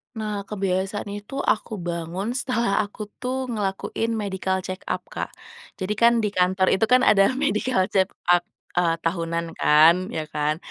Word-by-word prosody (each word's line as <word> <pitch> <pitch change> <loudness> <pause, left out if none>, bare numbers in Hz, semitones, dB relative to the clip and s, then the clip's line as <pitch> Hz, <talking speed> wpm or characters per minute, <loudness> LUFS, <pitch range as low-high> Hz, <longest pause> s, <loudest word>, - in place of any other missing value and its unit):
Nah 210 -2 -4
kebiasaan 195 0 -2
itu 205 +6 -7
aku 215 0 0
bangun 175 +5 -3
setelah 235 -5 0
aku 210 0 -4
tuh 255 0 -3
ngelakuin 215 +2 -2
medical 190 -2 -2
check 185 0 -5
up - - -2
Kak, - - -4 0.5
jadi 190 +2 -2
kan 235 0 +6
di 210 - +1
kantor 185 0 +2
itu 190 +4 +3
kan 250 +1 +5
ada 195 -2 +6
medical 215 -4 +1
check 190 -1 +3 0.2
up, 175 0 +5 0.4
eee, 170 -2 +3
tahunan 170 -1 -2
kan, 165 +5 +5
ya 155 - -2
kan? 150 +1 0
195 Hz, 155 wpm, -24 LUFS, 180-215 Hz, 0.5 s, kan